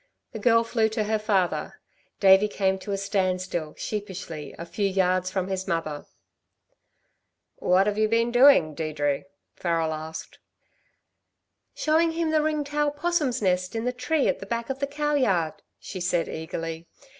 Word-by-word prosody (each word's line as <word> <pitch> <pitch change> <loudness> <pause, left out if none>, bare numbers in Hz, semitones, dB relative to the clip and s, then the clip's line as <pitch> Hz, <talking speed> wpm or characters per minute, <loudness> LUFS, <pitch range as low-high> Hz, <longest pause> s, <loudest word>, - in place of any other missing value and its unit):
The 220 - -6
girl 230 +1 +4
flew 225 -1 +1
to 220 0 -1
her 215 +1 0
father. 200 -4 0 0.4
Davey 195 +1 +6
came 190 -2 0
to 200 - -6
a 195 - 0
standstill 185 -5 -1
sheepishly, 190 -7 -5
a 170 - -6
few 200 +4 -1
yards 185 -1 +1
from 185 -1 -2
his 190 0 -3
mother. 165 -4 -3 1.5
"What 185 +2 +3
have 210 0 -1
you 215 - +4
been 230 +2 +1
doing, 245 - +6
Deirdre?" 145 -1 -2 0.3
Farrel 165 -2 0
asked. 160 +1 -7 1.4
"Showing 325 +2 +2
him 330 -1 0
the 310 -1 +3
ring 305 -1 0
tail 295 +1 0
'possum's 290 -5 -1
nest 185 +1 0
in 225 +1 -2
the 250 - 0
tree 260 +4 0
at - - 0
the 195 - -8
back 235 +3 -2
of 265 - -5
the 280 - -1
cow 295 +1 -1
yard," 190 - +1 0.2
she 185 - -7
said 175 -1 0
eagerly. 165 +1 -5
195 Hz, 160 wpm, -26 LUFS, 175-245 Hz, 1.5 s, Davey